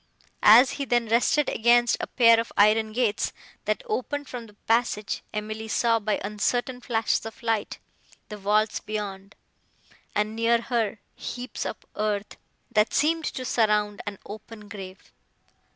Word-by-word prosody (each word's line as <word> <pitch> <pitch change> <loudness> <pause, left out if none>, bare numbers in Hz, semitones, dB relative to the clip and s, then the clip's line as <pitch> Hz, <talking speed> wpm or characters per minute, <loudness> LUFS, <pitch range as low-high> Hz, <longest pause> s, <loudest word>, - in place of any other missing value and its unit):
As 240 +5 +8
he 280 - -4
then 240 -2 +1
rested 250 +5 +3
against 240 +1 +3
a - - -3
pair 230 -2 +5
of 230 - -3
iron 215 +1 +4
gates, 225 -2 0 0.3
that - - -1
opened 290 - -3
from 240 -2 -7
the 210 - -18
passage, 225 -3 0
Emily 215 +1 -5
saw, 230 +1 +2
by 215 -1 -1
uncertain 245 +5 -1
flashes 225 -2 0
of 225 +1 -9
light, 225 -3 -1 0.5
the 210 - -7
vaults 210 +2 +1
beyond, 205 -2 -6 0.8
and, 210 +1 0
near 230 +1 +3
her, 230 -3 -1 0.2
heaps 250 +1 -5
of - - -5 0.2
earth, 210 -1 -2 0.3
that 215 0 +2
seemed 320 +2 +2
to 255 - -4
surround 210 -3 +1
an 205 -1 -4
open 215 0 -10
grave. 195 -2 -10
220 Hz, 145 wpm, -26 LUFS, 210-240 Hz, 0.8 s, As